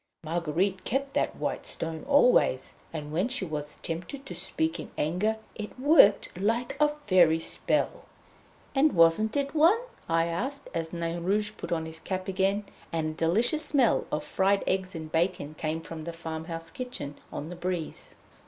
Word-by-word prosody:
Marguerite 175 +4 0
kept 275 +3 -1
that - - 0
white - - -3
stone 160 -1 -4
always, 250 - +4 0.2
and 150 -2 -5
when 180 +8 +1
she 255 -6 -2
was 150 -2 -5
tempted 180 - -4
to - - -6
speak 320 0 -1
in - - -7
anger 185 +8 +1 0.2
it 210 +4 -7
worked 265 -8 +5
like 230 +5 0
a 300 - +6
Fairy 185 - +4
spell." 165 - -1 0.7
"And 290 +2 +4
wasn't 170 +8 +4
it 280 0 -1
one?" 325 +7 +6 0.3
I 165 0 +3
asked, 260 +12 -3
as 165 -1 -2
Nain 170 0 -3
Rouge 210 +3 +1
put - - -7
on 160 -1 0
his 160 0 -7
cap 185 +2 -4
again, 195 +2 +1 0.3
and 160 -1 -1
a - - -8
delicious 215 - +2
smell 280 -6 +3
of 150 - -1
fried 195 +1 +2
eggs 190 -1 -1
and 160 -1 -6
bacon 165 -3 0
came 155 +1 -3
from 160 -1 -8
the 170 - -4
farmhouse 165 0 -6
kitchen 250 - -6 0.2
on 150 - -5
the 180 - -6
breeze. 175 -2 -4
180 Hz, 170 wpm, -28 LUFS, 165-235 Hz, 0.7 s, a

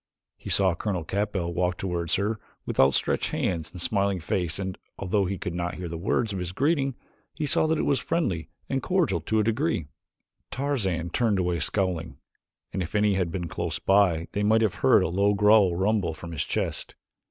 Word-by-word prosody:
He - - -9
saw 95 -3 +4
Colonel 90 0 -2
Capell 95 -2 -2
walk 90 +1 0
toward 85 -3 -3
her 105 +3 0 0.3
with - - -4
outstretched 65 0 +3
hands 85 -3 -2
and 90 - -9
smiling 100 -3 +1
face 85 0 -1
and, 95 -1 -4 0.2
although 100 +1 0
he 95 +1 -2
could 90 - -4
not 85 0 -3
hear 90 - -5
the 85 - -5
words 105 +5 0
of 95 - -3
his 90 0 -4
greeting, 135 - +1 0.4
he 155 - -2
saw 145 - +2
that 160 0 +1
it - - 0
was 140 - +2
friendly 95 - -1 0.2
and 135 0 -1
cordial 165 - +1
to 110 +7 0
a - - +3
degree. 115 - 0 0.6
Tarzan 95 - -1
turned 110 -1 +2
away 90 -2 0
scowling, 90 0 -1 0.6
and 95 - -1
if 85 +3 -5
any 105 0 +3
had 90 -3 0
been 90 -1 -3
close - - -3
by 95 -4 +3
they 105 - -2
might 110 +2 +4
have 105 - +1
heard - - +5
a - - +1
low 100 +4 +2
growl 105 -3 +5
rumble 95 -3 +1
from 85 +2 -8
his 75 -3 -2
chest. - - -3
95 Hz, 200 wpm, -26 LUFS, 85-110 Hz, 0.6 s, heard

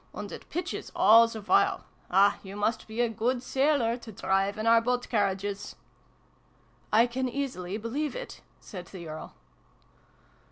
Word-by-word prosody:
And - - -6
it - - -10
pitches 350 - -4
all 230 +2 +7
the 225 -1 -7
while. 375 - +2 0.2
Ah, 200 +2 +4
you 195 0 -9
must 210 +2 -1
be 220 +2 -2
a 240 - +3
good 240 +3 -1
sailor, 265 -3 +1
to 235 -2 -11
drive 195 0 0
in 215 - -3
our 230 0 +6
boat 250 +1 -1
carriages! 200 -1 -1 0.4
" - - -36
" - - -35 0.3
I 225 +2 +6
can 255 +1 -2
easily 235 -8 -3
believe 265 +7 -3
it," - - -7 0.2
said 180 -4 -9
the 175 -4 -9
Earl. 155 - -8
225 Hz, 165 wpm, -28 LUFS, 200-245 Hz, 0.4 s, all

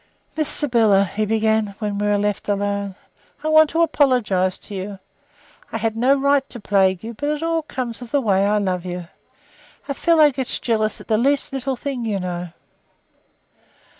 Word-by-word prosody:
"Miss 310 -2 -1
Sybylla," 225 -8 +3
he 210 +3 -2
began, 220 -1 +1
when 205 -2 -3
we 205 - 0
were 205 0 +2
left 205 0 -2
alone, 200 -1 -1 0.5
"I 310 - 0
want 310 -1 +6
to 330 +2 +2
apologize 245 - +2
to 210 - -11
you. 195 +1 -5 0.7
I - - -2
had 225 0 -1
no 255 +4 +3
right 280 0 +2
to 240 - -9
plague 190 -3 +2
you, 230 +1 -6
but 290 +6 -3
it 300 +1 -2
all 330 0 0
comes 255 -6 -5
of 245 - -8
the 285 - +2
way 195 -6 +2
I 205 +1 +2
love 185 -3 -1
you. 180 -1 -6 0.8
A 280 - -1
fellow 310 0 +4
gets 265 -1 -2
jealous 215 -3 -1
at - - -14
the 215 -1 +2
least 280 +3 +1
little 270 0 -2
thing, 260 -1 -4
you 210 -3 -1
know." 180 -1 -4
220 Hz, 185 wpm, -21 LUFS, 200-275 Hz, 0.8 s, want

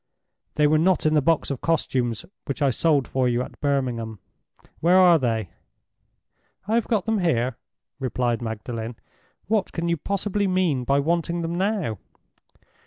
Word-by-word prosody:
"They 150 - +3
were 155 +1 +4
not 180 +1 +2
in 155 - +3
the 150 - +4
box 160 0 +1
of 135 - -4
costumes 125 -8 0 0.2
which 140 - -4
I 135 - +4
sold 145 +1 +2
for 130 -1 +1
you 120 +1 0
at - - -11
Birmingham. 125 -6 -1 0.6
Where 175 +3 +4
are 175 -3 +7
they?" 115 - -1 1.2
"I 215 - 0
have 235 -1 +2
got 215 -5 0
them 220 -2 +1
here," 130 -9 +1 0.4
replied 125 -2 -1
Magdalen. 115 +1 -5 0.5
"What 210 -1 0
can 170 0 -2
you 170 - +1
possibly 200 +4 -1
mean 180 -9 +1
by 140 +2 +2
wanting 170 +3 0
them 165 +1 -2
now?" 185 - -1
150 Hz, 160 wpm, -24 LUFS, 125-175 Hz, 1.2 s, are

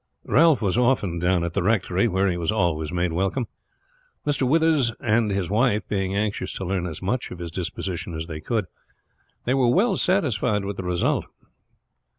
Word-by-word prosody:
Ralph 155 -4 +4
was 100 +4 +1
often 115 -9 +1
down 90 0 +2
at 85 -1 -3
the - - 0
Rectory, 100 -2 +1
where 95 -1 +1
he 90 - 0
was 85 -2 -1
always 85 -7 0
made 85 -1 0
welcome, 95 +8 0 0.8
Mr. 140 -3 +1
Withers 155 -5 +3
and 110 -1 +2
his 100 -3 -1
wife 105 +2 +1
being 95 -1 -1
anxious 100 -2 -2
to 95 - -5
learn 90 -1 -1
as 80 +2 -7
much 120 +7 -1
of - - -8
his 85 -1 -6
disposition 90 0 -4
as 80 0 -4
they 80 -2 -7
could. 110 +4 -1 0.8
They 125 - +1
were 130 -3 +3
well 200 - +3
satisfied 125 - +1
with 100 0 -4
the 95 - -4
result. 90 -1 0
100 Hz, 180 wpm, -24 LUFS, 90-120 Hz, 0.8 s, Ralph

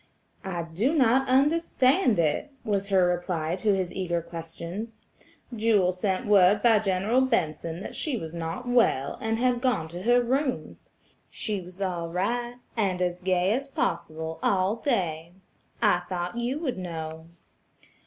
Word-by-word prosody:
"I 180 -3 -3
do 195 - 0
not 265 -1 +3
understand 275 - +3
it," 160 - +1
was 200 -3 -1
her 190 -2 +4
reply 175 -2 -1
to 205 +1 +2
his 185 -2 -2
eager 175 -2 -1
questions; 170 +7 -7 0.6
"Jewel 210 -5 +3
sent 185 +1 -2
word 205 0 +5
by 225 -3 +6
General 200 +5 +1
Benson 170 - -1
that - - -7
she 290 -6 -1
was 160 -5 -6
not 170 +9 -5
well, 230 - +2
and 225 -1 0
had 245 0 +1
gone 250 -12 +1
to 175 +2 -7
her 240 +4 +4
rooms. 260 +1 -2 0.4
She 210 -4 -3
was 180 +1 -13
all 175 -3 -2
right, 240 +7 -1 0.2
and 195 -5 0
as 180 0 -1
gay 185 0 +2
as 275 +4 -2
possible 160 - -3
all 190 +2 +2
day. 175 - -1 0.5
I 175 - +4
thought 180 +2 -3
you 240 +3 -1
would 270 - -3
know." 160 -2 -6
190 Hz, 150 wpm, -27 LUFS, 175-240 Hz, 0.6 s, by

